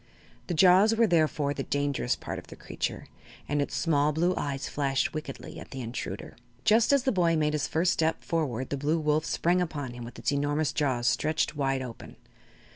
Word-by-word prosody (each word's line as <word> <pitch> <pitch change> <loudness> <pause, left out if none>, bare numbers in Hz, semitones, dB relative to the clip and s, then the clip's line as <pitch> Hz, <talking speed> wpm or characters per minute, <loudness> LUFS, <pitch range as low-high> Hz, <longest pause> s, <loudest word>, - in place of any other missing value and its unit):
The 175 - -2
jaws 190 +6 +6
were 230 +1 +4
therefore 155 -6 +2
the 140 - -4
dangerous 140 -2 0
part - - -6
of - - -14
the - - -10
creature, - - -4 0.4
and 145 0 0
its 140 - -3
small 150 -2 +2
blue 170 +4 +1
eyes 140 -1 -3
flashed 135 -2 0
wickedly 150 -3 -7
at - - -11
the 135 - -6
intruder. 120 +1 -6 0.3
Just 220 +3 +5
as 280 -2 +4
the 265 - +2
boy 170 -4 +2
made 150 -1 +1
his 150 -2 0
first 170 +3 +2
step 160 0 0
forward 130 -7 -2
the 140 - -1
Blue 150 +4 +1
Wolf 155 0 +1
sprang 180 +2 +1
upon 145 -7 -3
him 120 0 -8
with 120 0 -9
its 120 +4 -1
enormous 145 +1 0
jaws 130 -6 0
stretched 155 +4 +1
wide 135 -2 0
open. 120 -3 -9
150 Hz, 200 wpm, -28 LUFS, 135-165 Hz, 0.4 s, jaws